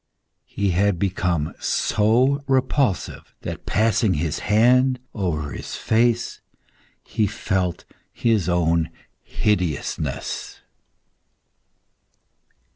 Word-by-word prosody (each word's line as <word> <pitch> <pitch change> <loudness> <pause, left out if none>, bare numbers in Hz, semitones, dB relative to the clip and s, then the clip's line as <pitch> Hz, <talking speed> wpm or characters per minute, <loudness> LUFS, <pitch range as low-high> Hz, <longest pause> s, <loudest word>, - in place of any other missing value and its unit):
He 100 -2 -1
had 100 +1 +2
become 90 -4 -1
so 125 +7 +2
repulsive, 130 -5 0
that - - -7
passing 110 -1 +2
his 80 +1 -1
hand 125 +4 +3
over 80 -8 -2
his - - -6
face, 120 +1 +1 0.6
he 105 - 0
felt 95 -3 -2 0.3
his 110 -7 +1
own 85 -2 +2 0.3
hideousness. 90 -9 -2
100 Hz, 80 wpm, -22 LUFS, 90-115 Hz, 0.6 s, hand